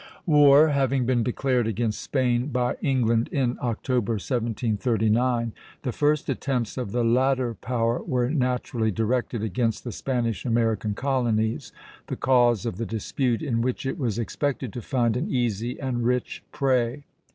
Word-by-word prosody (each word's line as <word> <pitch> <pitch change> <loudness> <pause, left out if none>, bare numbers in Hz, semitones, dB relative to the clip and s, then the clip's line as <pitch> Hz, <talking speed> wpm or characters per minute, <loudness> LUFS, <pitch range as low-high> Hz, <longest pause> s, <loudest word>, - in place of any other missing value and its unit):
War 150 -1 +6
having 135 -2 +1
been 125 -1 +2
declared 125 0 0
against 115 0 -1
Spain 125 -2 0
by 125 -3 0
England 120 -4 +2
in 130 -4 0
October, 120 -1 -1
1739, 115 +1 0 0.3
the 130 - -1
first 150 +4 +1
attempts 125 -5 -2
of 125 -6 -4
the 120 +1 0
latter 130 +1 +2
power 115 +2 -1
were 125 -1 0
naturally 125 -5 0
directed 115 +2 -1
against 110 +2 -1
the 120 - -5
Spanish 115 -6 -2
American 115 -3 0
colonies, 120 -5 0 0.4
the - - -3
cause 120 -3 +3
of 115 -6 -3
the 115 - -2
dispute, 115 +3 -1
in 120 -6 0
which 125 +2 -2
it 135 +6 -3
was 120 -6 -1
expected 130 0 -2
to 120 - -5
find 120 -3 0
an 125 - -2
easy 120 -1 -1
and 125 -3 -2
rich 125 +1 -1
prey. 130 -2 0
120 Hz, 150 wpm, -25 LUFS, 115-130 Hz, 0.4 s, War